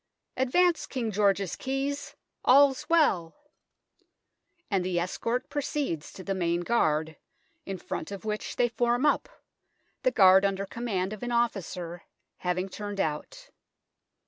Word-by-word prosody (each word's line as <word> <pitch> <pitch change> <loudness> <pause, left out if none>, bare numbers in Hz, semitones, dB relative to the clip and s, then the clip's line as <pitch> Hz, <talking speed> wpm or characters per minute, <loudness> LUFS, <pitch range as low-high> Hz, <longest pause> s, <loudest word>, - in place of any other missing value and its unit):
" - - -55
Advance, 350 +5 +2
King 235 -5 -2
George's 200 -2 +1
keys: 275 +2 -3 0.3
all's 280 +2 +5
well 190 - +3 0.7
" 350 -6 -47
and 195 -2 +2
the 180 -1 0
escort 230 +7 -2
proceeds 285 - -3
to 185 - -10
the 195 - -2
Main 175 -2 0
Guard, 160 -7 +1 0.5
in 195 - -3
front 165 - -5
of 200 +1 -7
which 215 0 -3
they 245 - +3
form 240 +3 +1
up, 400 +11 +2 0.7
the - - +3
guaid 190 - +7
under 195 0 0
command 200 -3 -2
of 215 - -9
an 245 - -3
officer, 185 -7 -1 0.4
having 180 +1 -1
turned 205 +1 -6
out. 150 -5 -3
205 Hz, 140 wpm, -28 LUFS, 185-250 Hz, 0.7 s, guaid